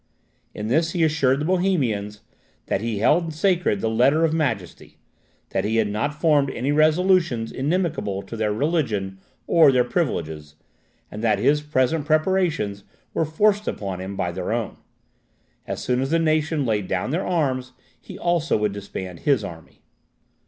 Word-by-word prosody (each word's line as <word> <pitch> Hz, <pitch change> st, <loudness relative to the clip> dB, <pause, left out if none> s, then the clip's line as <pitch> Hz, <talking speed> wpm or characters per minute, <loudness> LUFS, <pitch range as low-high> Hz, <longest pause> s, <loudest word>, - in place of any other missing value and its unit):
In 105 Hz, -, -4 dB
this 160 Hz, +8 st, +1 dB
he 175 Hz, -3 st, +1 dB
assured 140 Hz, -4 st, +2 dB
the -, -, -1 dB
Bohemians, 130 Hz, -, 0 dB, 0.4 s
"that 95 Hz, -, -1 dB
he 115 Hz, -2 st, -2 dB
held 160 Hz, -, +2 dB
sacred 175 Hz, -, +1 dB
the -, -, 0 dB
Letter 125 Hz, +8 st, +3 dB
of 160 Hz, -, 0 dB
Majesty 115 Hz, -, -3 dB, 0.5 s
that -, -, -1 dB
he 110 Hz, +2 st, -1 dB
had 110 Hz, -2 st, +2 dB
not 145 Hz, +9 st, -2 dB
formed 150 Hz, -4 st, +3 dB
any 130 Hz, +3 st, -2 dB
resolutions 155 Hz, -5 st, +2 dB
inimical 145 Hz, -, -1 dB
to -, -, -8 dB
their 110 Hz, -1 st, 0 dB
religion 105 Hz, -, -1 dB, 0.3 s
or 160 Hz, -4 st, +6 dB
their 125 Hz, -1 st, +3 dB
privileges, 80 Hz, -, -3 dB, 0.6 s
and 105 Hz, +2 st, -7 dB
that 110 Hz, -3 st, +3 dB
his 140 Hz, +8 st, +2 dB
present 150 Hz, +1 st, 0 dB
preparations 155 Hz, -, +1 dB, 0.3 s
were 165 Hz, -, +1 dB
forced 205 Hz, +7 st, +1 dB
upon 95 Hz, -3 st, -4 dB
him 95 Hz, +1 st, -6 dB
by 90 Hz, -2 st, -2 dB
their 95 Hz, +4 st, -4 dB
own. 115 Hz, -2 st, -2 dB, 0.9 s
As -, -, -4 dB
soon 125 Hz, +1 st, 0 dB
as 135 Hz, -, -1 dB
the 165 Hz, -, +2 dB
nation 155 Hz, -2 st, +1 dB
laid 105 Hz, -5 st, -1 dB
down 95 Hz, +7 st, -2 dB
their 175 Hz, +5 st, -1 dB
arms, 130 Hz, -7 st, -1 dB, 0.3 s
he -, -, -10 dB
also 175 Hz, -2 st, +1 dB
would 105 Hz, -1 st, 0 dB
disband 95 Hz, -3 st, -7 dB
his 135 Hz, -7 st, +2 dB
army." 80 Hz, -4 st, -10 dB
130 Hz, 160 wpm, -23 LUFS, 105-160 Hz, 0.9 s, or